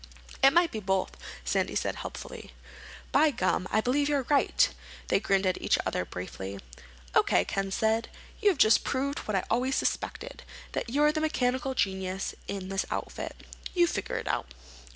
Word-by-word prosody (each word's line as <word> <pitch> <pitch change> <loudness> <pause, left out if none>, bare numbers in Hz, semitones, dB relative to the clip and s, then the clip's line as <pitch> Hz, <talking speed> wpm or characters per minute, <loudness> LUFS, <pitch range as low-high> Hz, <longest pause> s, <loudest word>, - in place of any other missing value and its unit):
"It 270 - +9
might 345 +1 +4
be 220 - -3
both," 190 -2 0 0.3
Sandy - - 0
said - - -1
helpfully. - - -8 0.6
"By 305 +3 +5
gum, 185 -7 0
I 215 - +2
believe 285 +5 +1
you're 285 -2 +1
right." 290 - +4 0.4
They - - +4
grinned 195 -1 +1
at 185 -1 0
each - - +3
other 90 - -1
briefly. 95 +2 -6 0.6
"O.K.," 90 - +4
Ken 195 - -2
said 220 +3 +1
then, - - -19 0.3
"you 420 - +5
have 370 - +1
just 215 -4 +5
proved 280 +1 -1
what 215 - -3
I 190 - +1
always 255 +3 +2
suspected—that - - -4
you're 295 +4 +4
the 310 0 -2
mechanical 260 -3 0
genius 190 -2 -1
in 195 -2 -4
this 195 0 0
outfit. - - -5 0.3
You 350 -1 +6
figure 205 - -2
it - - -5
out." - - -2
225 Hz, 170 wpm, -29 LUFS, 190-280 Hz, 0.6 s, It